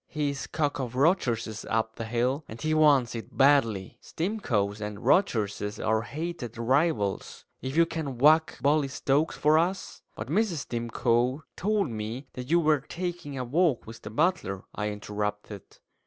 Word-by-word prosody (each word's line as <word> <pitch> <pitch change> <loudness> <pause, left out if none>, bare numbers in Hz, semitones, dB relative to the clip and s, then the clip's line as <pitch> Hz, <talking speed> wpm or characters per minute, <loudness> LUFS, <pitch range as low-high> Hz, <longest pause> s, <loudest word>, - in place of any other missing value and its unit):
"He's 145 -2 -2
cock 145 -3 -1
of 125 -2 -4
Rogerses 120 - +1
up 110 0 0
the 115 - -5
hill, 125 +6 0
and 110 - -9
he 155 +4 0
wants 145 -6 +4
it 115 -1 -8
badly. 125 -9 +3
Stimcoes 115 - -2
and 105 -1 -4
Rogerses 105 - +1
are 110 0 +1
hated 140 -3 -5
rivals. 120 - 0 0.2
If 130 +4 -4
you 170 - +6
can 160 -6 -4
whack 155 +5 +4
Bully 145 0 +3
Stokes 140 +3 0
for 155 +1 +4
us 180 +3 -2
" - - -41
"But 110 - -6
Mrs. 175 - 0
Stimcoe 120 +3 0
told 200 - 0
me 110 +5 -5
that 125 +1 -7
you 170 +2 +4
were 155 -2 +3
taking 170 -1 -5
a 130 - -2
walk 150 +1 +1
with 115 0 -10
the 105 - -7
butler," 115 - 0
I 105 0 -2
interrupted. 105 -1 -5
130 Hz, 160 wpm, -27 LUFS, 110-155 Hz, 0.2 s, you